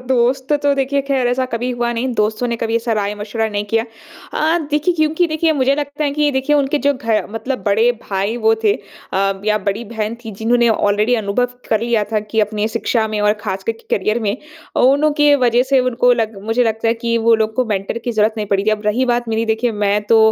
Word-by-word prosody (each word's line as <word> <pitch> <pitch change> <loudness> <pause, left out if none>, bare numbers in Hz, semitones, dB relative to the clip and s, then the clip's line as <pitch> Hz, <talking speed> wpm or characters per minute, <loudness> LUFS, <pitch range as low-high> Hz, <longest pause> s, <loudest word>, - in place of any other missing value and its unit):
दोस्त 260 +2 +1
तो 285 0 +3
देखिए 275 +1 0
ख़ैर 260 -3 +1
ऐसा 255 +1 0
कभी 245 +1 -3
हुआ 240 -1 -1
नहीं, 235 +3 -2
दोस्तों 215 +3 0
ने 235 - -1
कभी 230 0 -1
ऐसा 230 0 -1
राय 205 -1 -1
मशविरा 215 +2 -3
नहीं 205 0 -3
किया। 225 0 +2 0.5
अ, 320 +3 +2
देखिए 300 +4 +1
क्योंकि 315 +2 +1
देखिए 315 +1 +1
मुझे 275 -1 +2
लगता 290 +1 -3
है 285 - +1
कि 300 +1 -1
ये 295 - +3
देखिए 295 +3 +2
उनके 285 +1 +1
जो 285 - +5
घर 230 -5 -1
मतलब 255 +4 -4
बड़े 220 +4 +3
भाई 200 +4 -2
वो 225 - +6
थे 205 - +5
अ, 195 0 -4
या 215 0 +2
बड़ी 215 +4 -2
बहन 220 0 -2
थी 220 - -6
जिन्होंने 235 +1 +3
ऑलरेडी 215 +2 +2
अनुभव 205 +5 0 0.2
कर 220 -1 +2
लिया 230 -2 +1
था 215 - +2
कि 220 - +3
अपनी 210 0 -1
शिक्षा 225 0 0
में 215 -1 -3
और 210 0 +3
ख़ासकर 195 +1 -2
के 225 - -3
करियर 215 +4 0
में। 210 +2 -1 0.4
अ, - - +3
उनकी 290 +2 +4
वजह 240 +1 +4
से 270 -1 +5
उनको 245 0 +2
लग 225 -3 -1
मुझे 225 +3 +1
लगता 225 0 0
है 225 - +2
कि 230 0 +1
वो 230 - +7
लोग 220 0 -7
को 255 - +2
मेंटर 205 +1 -2
की 240 +1 -4
ज़रूरत 215 0 +2
नहीं 210 -1 -3
पड़ी 200 0 0
थी, 215 - +2
अब 210 -1 -1
रही 240 +5 +2
बात 240 -1 -2
मेरी, 225 0 0
देखिए 225 +1 0
मैं 205 0 +1
तो 225 - +6
230 Hz, 235 wpm, -18 LUFS, 215-260 Hz, 0.5 s, वो